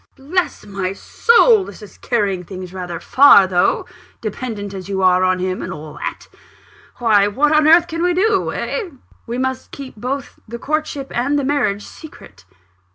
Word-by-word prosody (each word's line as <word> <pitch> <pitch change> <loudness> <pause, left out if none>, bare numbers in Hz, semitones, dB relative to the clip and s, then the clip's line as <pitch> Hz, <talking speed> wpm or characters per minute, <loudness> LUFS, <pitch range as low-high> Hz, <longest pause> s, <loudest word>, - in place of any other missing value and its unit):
"Bless 335 - -2
my 195 -2 -3
soul! 465 - +3
this 235 - -11
is 205 - -14
carrying 200 -6 -1
things 185 0 -9
rather 180 -3 -6
far, 260 -8 +6
though 180 -1 +1 0.3
dependent 215 -2 -5
as 190 0 -8
you 190 -1 -1
are 185 0 +4
on 185 0 +2
him, 185 0 -3
and - - -5
all 150 0 -8
that. - - -6 0.7
Why, 210 -4 +3
what 280 +9 +1
on 305 -1 +4
earth 335 +2 +6
can 330 0 -4
we 355 0 +1
do 395 +1 +1
eh?" 435 -7 -3 0.4
"We 235 +1 -4
must 260 0 -3
keep 275 -2 -9
both 260 +5 -5
the 235 +2 -6
courtship 290 0 -3
and 275 +5 +1
the 285 - 0
marriage 215 -8 0
secret." 100 - -14
235 Hz, 170 wpm, -18 LUFS, 190-295 Hz, 0.7 s, far